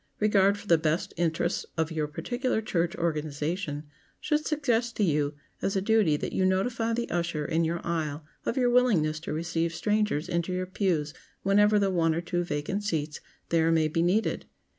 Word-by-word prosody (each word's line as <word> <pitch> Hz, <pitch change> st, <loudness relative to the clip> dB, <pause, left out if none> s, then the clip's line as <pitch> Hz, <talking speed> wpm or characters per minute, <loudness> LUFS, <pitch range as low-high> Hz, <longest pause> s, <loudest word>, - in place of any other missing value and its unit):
Regard 200 Hz, -1 st, +4 dB
for 205 Hz, -, -11 dB
the 170 Hz, -5 st, +4 dB
best 160 Hz, +5 st, -1 dB
interests 170 Hz, +1 st, 0 dB
of 160 Hz, 0 st, 0 dB
your 155 Hz, -2 st, -1 dB
particular 245 Hz, -, -2 dB
church 175 Hz, -6 st, -1 dB
organization 155 Hz, 0 st, -2 dB, 0.4 s
should 300 Hz, 0 st, 0 dB
suggest 245 Hz, -6 st, 0 dB
to 210 Hz, -, +1 dB
you 150 Hz, -4 st, +1 dB, 0.3 s
as 195 Hz, -, -1 dB
a -, -, +3 dB
duty 200 Hz, -7 st, +3 dB
that -, -, -4 dB
you 190 Hz, -, +1 dB
notify 225 Hz, +5 st, +1 dB
the 235 Hz, +1 st, -1 dB
usher 170 Hz, -3 st, -1 dB
in 165 Hz, +1 st, +1 dB
your 170 Hz, +1 st, -1 dB
aisle 155 Hz, -3 st, -2 dB, 0.2 s
of 240 Hz, -, -2 dB
your 245 Hz, -2 st, +3 dB
willingness 185 Hz, -12 st, +3 dB
to 165 Hz, -, -6 dB
receive 165 Hz, +1 st, -1 dB
strangers 210 Hz, -3 st, 0 dB
into 170 Hz, 0 st, -1 dB
your 185 Hz, 0 st, -1 dB
pews 180 Hz, -6 st, -1 dB, 0.3 s
whenever 205 Hz, +2 st, +4 dB
the 200 Hz, -1 st, +2 dB
one 165 Hz, -3 st, +2 dB
or 170 Hz, -, -1 dB
two 175 Hz, 0 st, -1 dB
vacant 170 Hz, +6 st, -3 dB
seats 155 Hz, -6 st, -2 dB, 0.3 s
there 165 Hz, 0 st, +3 dB
may 160 Hz, -1 st, +3 dB
be 160 Hz, +2 st, 0 dB
needed. 185 Hz, +6 st, +1 dB
170 Hz, 185 wpm, -28 LUFS, 160-205 Hz, 0.4 s, Regard